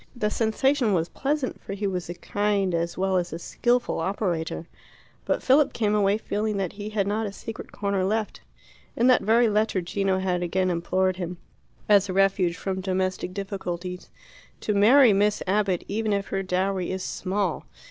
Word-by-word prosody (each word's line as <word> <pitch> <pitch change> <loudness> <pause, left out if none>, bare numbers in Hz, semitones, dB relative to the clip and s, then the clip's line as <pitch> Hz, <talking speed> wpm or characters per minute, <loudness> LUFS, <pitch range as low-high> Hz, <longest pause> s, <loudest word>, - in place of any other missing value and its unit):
The 210 -3 -1
sensation 240 +1 +1
was 165 -2 0
pleasant, 280 -1 -2
for - - -6
he 200 +1 -3
was 180 -3 -2
a 175 - -4
kind 205 -1 0
as 170 0 -1
well 190 0 +1
as 175 -1 -1
a 165 - -4
skilful 240 +7 0
operator. 170 -3 -2 0.6
But - - -1
Philip 275 +2 +4
came 210 -2 0
away 205 -1 +3
feeling 215 -1 -2
that 190 -3 -2
he 205 +1 -6
had 210 -2 0
not 210 +2 -1
a - - -5
secret 225 +2 -8
corner 200 -2 -1
left. 215 +2 -1 0.6
In 235 - +3
that 255 0 +5
very 230 +2 +4
letter 210 -2 +1
Gino 190 +2 0
had 185 -2 -1
again 185 +1 0
implored 185 +2 0
him, 180 -1 -5 0.5
as 200 -2 +4
a - - -2
refuge 190 -2 +2
from 190 -1 -3
domestic 185 -1 -1
difficulties, 180 -2 -5 0.5
"to 210 - 0
marry 225 +4 +6
Miss 205 +1 +2
Abbott, 195 -2 +1
even 215 +1 -1
if 200 0 -2
her 195 - -1
dowry 185 0 -1
is 185 0 -3
small." 190 -2 -2
195 Hz, 180 wpm, -25 LUFS, 185-210 Hz, 0.6 s, marry